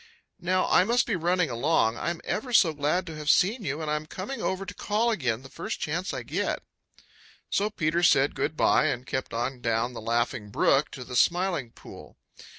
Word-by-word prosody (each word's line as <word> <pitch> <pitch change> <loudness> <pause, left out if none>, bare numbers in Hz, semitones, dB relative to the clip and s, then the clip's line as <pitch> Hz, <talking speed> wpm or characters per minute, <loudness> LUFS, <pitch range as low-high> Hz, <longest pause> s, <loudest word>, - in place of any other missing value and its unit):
Now 185 +1 +1
I 180 - +5
must 235 +5 +2
be 225 - -1
running 175 -2 +1
along. 120 -2 +2
I'm 170 +5 -3
ever 245 +4 -3
so 170 -8 +5
glad 150 +5 0
to 165 -3 -7
have 150 -1 -3
seen 210 +9 +3
you, 155 -1 -3
and 150 - -2
I'm 150 0 -2
coming 200 - -6
over 190 +1 -2
to - - -7
call 220 +3 0
again 125 - -1
the - - -10
first 195 +10 -5
chance 175 +5 -2
I - - -5
get." - - -2 0.9
So 205 +1 +1
Peter 170 -4 0
said 145 -5 +4
good 155 +1 -2
by - - +4
and 125 -4 -2
kept 130 - -3
on 120 +2 -3
down 115 +1 0
the 115 - -7
Laughing 115 -1 -1
Brook 135 +7 +2
to 130 - -7
the 125 0 -8
Smiling 175 -3 +2
Pool. - - -13
155 Hz, 200 wpm, -27 LUFS, 130-185 Hz, 0.9 s, I